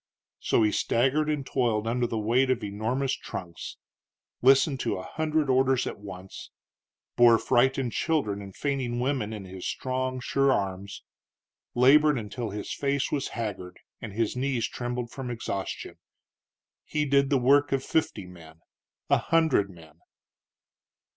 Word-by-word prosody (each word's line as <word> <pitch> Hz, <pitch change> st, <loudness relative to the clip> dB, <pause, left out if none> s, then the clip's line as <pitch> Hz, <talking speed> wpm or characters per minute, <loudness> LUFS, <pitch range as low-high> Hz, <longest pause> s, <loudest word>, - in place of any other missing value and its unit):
So 115 Hz, -, +2 dB
he 105 Hz, -, +3 dB
staggered 135 Hz, +9 st, +1 dB
and 150 Hz, -3 st, -1 dB
toiled 115 Hz, -6 st, 0 dB
under 120 Hz, +1 st, 0 dB
the 115 Hz, -, -3 dB
weight 120 Hz, +5 st, +2 dB
of 125 Hz, -3 st, 0 dB
enormous 115 Hz, +7 st, -1 dB
trunks; 85 Hz, -3 st, -7 dB, 0.6 s
listened 135 Hz, +2 st, +4 dB
to -, -, -1 dB
a 95 Hz, -, -6 dB
hundred 155 Hz, +2 st, -1 dB
orders 130 Hz, -1 st, +3 dB
at -, -, -5 dB
once; 95 Hz, -2 st, -9 dB, 0.7 s
bore 120 Hz, -1 st, +7 dB
frightened 130 Hz, +1 st, +2 dB
children 135 Hz, -11 st, 0 dB
and 95 Hz, -1 st, -10 dB
fainting 130 Hz, -4 st, -2 dB
women 125 Hz, -4 st, -1 dB
in 105 Hz, -3 st, -6 dB
his 95 Hz, -1 st, -7 dB
strong, 130 Hz, 0 st, -2 dB
sure 135 Hz, +2 st, +2 dB
arms; 100 Hz, -2 st, -3 dB, 0.7 s
labored 145 Hz, +4 st, +5 dB
until 115 Hz, +1 st, -4 dB
his 105 Hz, 0 st, -5 dB
face 140 Hz, -1 st, -1 dB
was 140 Hz, -2 st, -1 dB
haggard 95 Hz, -6 st, -5 dB, 0.2 s
and 110 Hz, -4 st, -7 dB
his 115 Hz, +2 st, -1 dB
knees 125 Hz, -2 st, 0 dB
trembled 120 Hz, -1 st, -4 dB
from 130 Hz, -2 st, -6 dB
exhaustion. 105 Hz, -5 st, -5 dB, 0.8 s
He 150 Hz, -1 st, -1 dB
did 140 Hz, -1 st, +3 dB
the 140 Hz, -, +3 dB
work 140 Hz, +3 st, +4 dB
of 135 Hz, -1 st, 0 dB
fifty 110 Hz, -, -1 dB
men 80 Hz, -3 st, -14 dB, 0.5 s
a -, -, +4 dB
hundred 160 Hz, -11 st, +2 dB
men. 80 Hz, -4 st, -16 dB
125 Hz, 145 wpm, -27 LUFS, 105-135 Hz, 0.8 s, bore